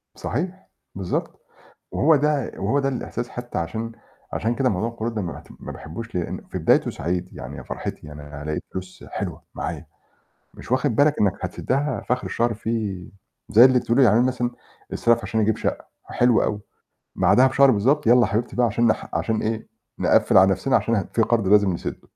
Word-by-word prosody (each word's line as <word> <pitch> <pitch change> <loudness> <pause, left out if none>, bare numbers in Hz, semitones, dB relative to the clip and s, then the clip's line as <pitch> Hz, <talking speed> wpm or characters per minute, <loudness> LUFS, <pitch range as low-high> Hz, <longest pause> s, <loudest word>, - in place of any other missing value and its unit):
صحيح، 180 - -4 0.3
بالضبط. 95 -2 -3 0.5
وهو 155 +3 +4
ده 145 -2 +1
وهو 110 +9 +1
ده 135 -1 +1
الإحساس 120 -1 -4
حتّى 120 0 -6
عشان 110 +7 -3 0.4
عشان 115 +2 -1
كده 130 0 +2
موضوع 110 +2 -1
القروض 115 0 -4
ده 105 - -1
ما 85 - -4
باعتم - - -12
ما - - -7
باحبوش، 100 +10 -8
لإن 90 -2 -3
في - - -3
بدايته - - +3
سعيد، 90 +4 -3
يعني - - -8
يا - - -8
فرحتي - - -6
يعني 75 0 -9
أنا 75 0 -9
هالاقي 75 +1 -2
فلوس 95 0 -8
حلوة - - -5
معايا، - - -4 0.7
مش - - -12
واخِد 130 -1 +1
بالك 145 +3 +3
إنّك 100 -3 +3
هتسدّها 140 +3 -2
فآخِر 125 0 0
الشهر 120 0 0
في 105 -4 -3 0.4
زي 115 +4 +8
اللي 130 -1 +5
بتقولي 120 +3 +3
يعني 110 -3 +5
أنا 125 - +4
مثلًا، 125 -1 -1 0.4
استلف 115 0 +3
عشان 110 - -1
أجيب 110 0 +2
شقّة - - -3 0.2
حلو 120 -2 +3
أوي، 105 - -1 0.6
بعدها 130 +1 +5
بشهر 135 +1 +5
بالضبط 130 +6 +2
يالّا 120 +2 +6
يا - - +4
حبيبتي 110 +4 -2
بقى 125 - +3
عشان 115 +1 +2
نح 110 - 0
عشان 110 -1 0
إيه، 110 0 -2 0.3
نقفّل - - +4
على 95 +1 +7
نَفْسنا 130 +7 +1
عشان 115 - +2
ه 100 - +1
في 115 - +2
قَرض 115 -3 +1
لازم 100 -1 +4
نسدّه. 85 - -6
115 Hz, 190 wpm, -23 LUFS, 100-125 Hz, 0.7 s, زي